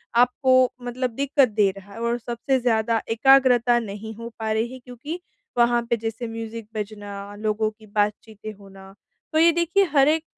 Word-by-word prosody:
आपको 255 Hz, +1 st, +4 dB
मतलब 250 Hz, +1 st, -3 dB
दिक्कत 280 Hz, 0 st, +3 dB
दे 210 Hz, -2 st, +2 dB
रहा 200 Hz, +1 st, -13 dB
है। 230 Hz, -, -9 dB
और 235 Hz, +1 st, 0 dB
सबसे 240 Hz, +3 st, -1 dB
ज़्यादा 230 Hz, -2 st, +1 dB
एकाग्रता 245 Hz, 0 st, +5 dB
नहीं 220 Hz, 0 st, -7 dB
हो 230 Hz, +1 st, -7 dB
पा 220 Hz, -1 st, -2 dB
रही 225 Hz, +3 st, -1 dB
है, 260 Hz, -, -9 dB
क्योंकि 250 Hz, +7 st, -8 dB, 0.4 s
वहाँ 240 Hz, 0 st, +4 dB
पे 235 Hz, -, +2 dB
जैसे 225 Hz, +2 st, -4 dB
म्यूज़िक 225 Hz, -1 st, -7 dB
बजना, 205 Hz, -1 st, -6 dB
लोगों 215 Hz, +1 st, -1 dB
की 215 Hz, 0 st, -19 dB
बातचीतें 210 Hz, +1 st, -3 dB
होना, 195 Hz, -1 st, -14 dB, 0.4 s
तो 315 Hz, -, +3 dB
ये 335 Hz, +1 st, +6 dB
देखिए 345 Hz, +4 st, +2 dB
हर 275 Hz, -1 st, +5 dB
एक 315 Hz, +1 st, +2 dB
230 Hz, 175 wpm, -23 LUFS, 215-255 Hz, 0.4 s, ये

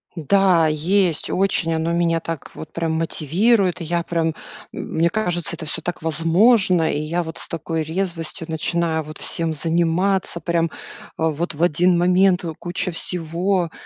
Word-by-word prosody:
Да, 175 Hz, 0 st, +3 dB
есть. 170 Hz, +2 st, +1 dB
Очень 185 Hz, -3 st, +1 dB
оно 160 Hz, +1 st, -1 dB
меня 170 Hz, -1 st, +1 dB
так 165 Hz, -2 st, -6 dB
вот 155 Hz, -1 st, -9 dB
прям 165 Hz, -1 st, -2 dB
мотивирует. 175 Hz, -, +1 dB
И -, -, -3 dB
я 170 Hz, +1 st, -1 dB
прям, 165 Hz, -1 st, -1 dB, 0.4 s
мне 165 Hz, +1 st, -1 dB
кажется, 175 Hz, -5 st, -1 dB
это 160 Hz, -, -7 dB
всё 160 Hz, +2 st, -4 dB
так 175 Hz, -1 st, -5 dB
возможно. 170 Hz, +2 st, +3 dB
И 145 Hz, -, -1 dB
я 170 Hz, +3 st, -2 dB
вот 160 Hz, 0 st, -7 dB
с -, -, -3 dB
такой 165 Hz, 0 st, -3 dB
резвостью 165 Hz, +1 st, -3 dB
начинаю 160 Hz, 0 st, 0 dB
вот 155 Hz, +1 st, -9 dB
всем 165 Hz, -1 st, +1 dB
заниматься, 170 Hz, +4 st, +1 dB
прям, 170 Hz, 0 st, 0 dB
э, -, -, -3 dB, 0.5 s
вот 160 Hz, 0 st, -1 dB
в 165 Hz, -, -1 dB
1 175 Hz, +2 st, +3 dB
момент 180 Hz, +1 st, +3 dB, 0.2 s
куча 180 Hz, +1 st, -2 dB
всего. 175 Hz, +1 st, -1 dB
170 Hz, 155 wpm, -21 LUFS, 160-180 Hz, 0.5 s, Да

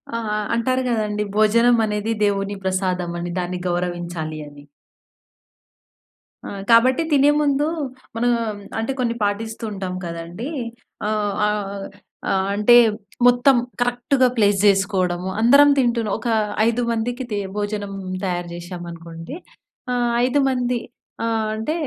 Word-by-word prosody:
ఆ! -, -, -1 dB, 0.3 s
అంటారు 255 Hz, +3 st, +1 dB
కదండీ. 210 Hz, -3 st, 0 dB
భోజనం 230 Hz, +3 st, +4 dB
అనేది 210 Hz, +1 st, -2 dB
దేవుని 200 Hz, 0 st, 0 dB
ప్రసాదం 185 Hz, -2 st, -1 dB, 0.3 s
దాన్ని 180 Hz, 0 st, -3 dB
గౌరవించాలి 175 Hz, -3 st, -3 dB
అని. 145 Hz, 0 st, -13 dB, 1.8 s
ఆ! -, -, -5 dB, 0.2 s
కాబట్టి 250 Hz, +5 st, +5 dB
తినే 285 Hz, 0 st, +5 dB
ముందు 290 Hz, 0 st, +2 dB, 0.5 s
మనం 240 Hz, +1 st, +2 dB, 0.5 s
అంటే, 225 Hz, +4 st, -1 dB
కొన్ని 235 Hz, -2 st, 0 dB
పాటిస్తూ 220 Hz, +3 st, -2 dB
ఉంటాం 190 Hz, -2 st, -4 dB
కదండీ. 170 Hz, -, -6 dB, 0.6 s
ఆహ్, 210 Hz, -1 st, 0 dB
ఆహ్, 200 Hz, -1 st, -3 dB, 0.5 s
ఆహ్, 190 Hz, 0 st, +1 dB
అంటే 210 Hz, +4 st, +5 dB, 0.5 s
మొత్తం 245 Hz, +2 st, +5 dB, 0.3 s
కరెక్ట్‌గా 245 Hz, +2 st, +2 dB
ప్లేస్ 205 Hz, -2 st, +3 dB
చేసుకోవడము. 190 Hz, -2 st, +1 dB
అందరం 280 Hz, +5 st, +7 dB
తింటున్నా 235 Hz, -4 st, +1 dB
ఒక 235 Hz, -, -3 dB, 0.4 s
ఐదు 235 Hz, +1 st, +1 dB
మందికి 240 Hz, +3 st, -2 dB
తి 205 Hz, -, 0 dB, 0.2 s
భోజనం 205 Hz, -1 st, -3 dB, 0.3 s
తయారు 175 Hz, -1 st, -2 dB
చేసాం 175 Hz, 0 st, -7 dB
అనుకోండి. 165 Hz, -, -9 dB, 0.6 s
ఆహ్, 240 Hz, -1 st, +1 dB
ఐదు 260 Hz, +3 st, +2 dB
మంది 250 Hz, -2 st, 0 dB, 0.5 s
ఆహ్, 225 Hz, -1 st, 0 dB
అంటే 220 Hz, +8 st, -2 dB
210 Hz, 120 wpm, -21 LUFS, 185-240 Hz, 1.8 s, అందరం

